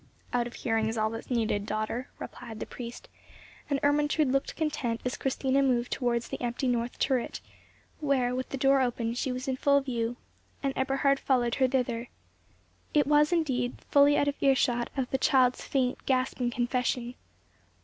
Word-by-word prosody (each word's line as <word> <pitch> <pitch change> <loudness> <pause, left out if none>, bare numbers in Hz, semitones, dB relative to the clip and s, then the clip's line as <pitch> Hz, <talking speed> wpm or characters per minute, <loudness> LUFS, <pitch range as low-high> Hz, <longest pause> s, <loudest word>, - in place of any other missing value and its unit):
"Out 240 -1 +1
of 240 - -10
hearing 225 -1 0
is 225 +1 -2
all 215 0 +1
that 225 - -4
is - - -14
needed, 220 -4 0
daughter," 215 +5 -3
replied 230 -3 -8
the - - -4
priest; 240 - -8 0.6
and 280 -1 +1
Ermentrude 295 0 +2
looked 275 0 0
content 295 -7 -1
as 250 - -1
Christina 270 0 0
moved 250 -3 +1
towards 240 -2 0
the - - -5
empty 245 +2 -1
north 240 -1 -1
turret, 260 -3 0 0.6
where, 270 -5 +1
with 255 0 -3
the 270 - -4
door 270 +1 +4
open, 235 -2 -1
she 255 +2 -2
was 255 +2 -4
in 260 -1 -1
full 280 +1 +4
view, 240 -3 -2 0.5
and 275 -1 0
Eberhard 275 +1 +2
followed 245 -3 +1
her 260 - +6
thither. 245 -2 -1 0.9
It 295 - +5
was 295 +2 +4
indeed 260 -8 0
fully 285 0 +6
out 285 - +2
of 285 - -2
earshot 260 -3 +2
of 260 -2 0
the 265 - +1
child's 255 -3 +3
faint, 255 -2 -1
gasping 255 -2 +1
confession. 245 0 -1
255 Hz, 175 wpm, -29 LUFS, 240-275 Hz, 0.9 s, her